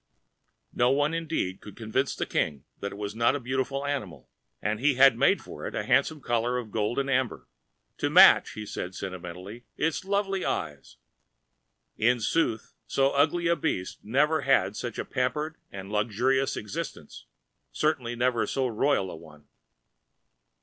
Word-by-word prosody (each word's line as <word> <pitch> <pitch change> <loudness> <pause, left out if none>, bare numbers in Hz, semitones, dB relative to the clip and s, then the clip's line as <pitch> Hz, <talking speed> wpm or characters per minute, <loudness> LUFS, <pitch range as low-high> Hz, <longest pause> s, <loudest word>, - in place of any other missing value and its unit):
No 120 +1 +3
one 145 +4 +2
indeed 160 - -2
could 105 - -12
convince 115 +4 -1
the - - -2
King 70 -3 -1 0.2
that 100 - -4
it - - -9
was 105 0 -4
not 115 +4 +2
a - - -2
beautiful 130 +2 -2
animal, 130 - -4 0.3
and 105 +2 -1
he 140 +2 +3
had 135 -1 +7
made 140 +11 +3
for - - -7
it - - -6
a - - -1
handsome 155 -2 +2
collar 120 0 0
of 115 -4 -5
gold 105 +2 -1
and 140 0 0
amber—"to 125 - -4
match," - - +7
he 110 - -6
said, 90 -2 -5
sentimentally, 95 +4 -7
"its 160 +4 0
lovely 195 -1 -1
eyes." 75 -4 -4 1.0
In 120 +2 +3
sooth 115 -1 0
so 135 0 +2
ugly 155 +5 +2
a 170 0 +3
beast 140 - -3
never 150 +8 +2
had 105 -7 +2
such 120 -1 -5
a - - -3
pampered 150 +5 -2
and 95 0 -8
luxurious 120 +6 +1
ex[Pg - - -4 0.2
225]istence, - - -7 0.5
certainly 130 -6 0
never 120 -1 +1
so 135 - 0
royal 115 -4 +1
a - - -7
one. 75 -2 -15
125 Hz, 160 wpm, -27 LUFS, 105-140 Hz, 1.0 s, had